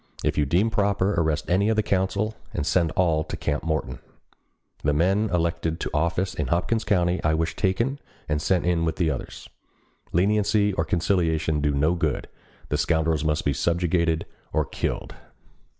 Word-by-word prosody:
If - - +1
you 75 -2 +1
deem 95 +10 +2
proper 100 -1 +1
arrest 80 -4 0
any 95 +5 +2
of 110 - +2
the 110 - +2
council, 100 +3 0 0.2
and 70 - -1
send 85 0 +2
all 80 -3 +2
to - - -5
Camp 75 -1 -1
Morton. 80 -2 -2 0.8
The 75 - +1
men 95 +8 +2
elected 85 -1 -1
to - - -3
office 85 +5 0
in - - -2
Hopkins 90 +6 0
County 90 -4 +1
I 80 +1 +2
wish 80 +1 -1
taken 115 +8 0 0.3
and 75 -1 0
sent 90 +2 +1
in 85 -2 +1
with 80 0 -2
others. 80 -7 -2 0.6
Leniency 105 +2 +2
and 80 -2 -1
conciliation 80 -4 +1
do 75 - +2
no 75 +4 +2
good. 80 -5 -1 0.4
The 75 - 0
scoundrels 80 -2 +1
must 75 0 0
be 70 - +2
subjugated 85 0 +1 0.3
or - - +1
killed." - - -3
85 Hz, 165 wpm, -25 LUFS, 80-95 Hz, 0.8 s, deem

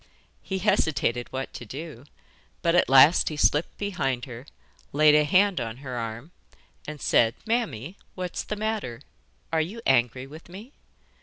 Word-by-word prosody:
He 190 - -4
hesitated 155 - 0
what 135 0 -5
to - - -8
do, 135 +1 -9 0.6
but 170 -1 +3
at 175 - +3
last 135 +5 +6
he 155 - -6
slipped 150 +2 +1
behind 135 -12 -2
her, 125 +2 -10 0.5
laid 150 +1 +5
a 150 0 +5
hand 185 +1 +3
on 115 0 -5
her 130 -2 -7
arm, 115 +6 -5 0.6
and 150 0 -6
said: 115 -3 +3
'Mammy, 200 - -2 0.2
what's 180 -1 -4
the 210 - -5
matter? 210 - -3 0.5
Are 160 - +3
you 190 +9 -5
angry 125 0 +2
with 155 +5 -13
me? 205 +9 -11
150 Hz, 155 wpm, -26 LUFS, 125-185 Hz, 0.6 s, last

